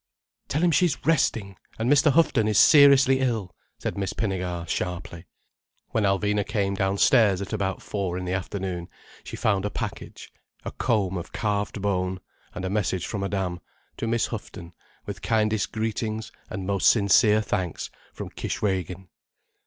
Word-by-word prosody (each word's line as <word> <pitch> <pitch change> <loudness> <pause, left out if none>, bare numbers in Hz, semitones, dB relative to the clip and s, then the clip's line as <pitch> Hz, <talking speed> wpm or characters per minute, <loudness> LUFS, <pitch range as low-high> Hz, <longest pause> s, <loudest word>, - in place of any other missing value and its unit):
"Tell 150 +5 -1
him 175 - +4
she's 165 -3 +1
resting, 115 - +1 0.2
and 110 - -1
Mr. 145 +2 +5
Houghton 135 -8 +3
is 105 -2 +1
seriously 140 -3 +7
ill," 115 -8 -1 0.2
said - - -4
Miss 100 0 -2
Pinnegar 90 -5 -3
sharply. 90 0 -4 0.6
When 110 - 0
Alvina 105 +1 +1
came 100 -1 -1
downstairs 100 +1 +3
at 100 +2 -5
about 100 -3 -2
four 95 -4 -3
in 90 - -4
the 90 - -2
afternoon 95 -2 -4 0.3
she - - -7
found 100 -3 +1
a 105 - -1
package: - - -7 0.3
a - - -4
comb 100 -6 0
of 85 - -9
carved 105 0 -2
bone, 95 -2 -1 0.4
and 90 - -4
a - - 0
message 95 -3 -1
from 105 - -4
Madame: 95 -3 -2 0.4
"To 115 - -3
Miss 115 0 +1
Houghton, 100 -6 -8 0.3
with - - -7
kindest 110 -2 +1
greetings 110 0 -3 0.2
and 95 -2 -5
most 100 -1 +3
sincere 105 0 +4
thanks 95 -4 -3 0.2
from - - -8
Kishwégin." 95 -2 -3
100 Hz, 155 wpm, -25 LUFS, 95-110 Hz, 0.6 s, seriously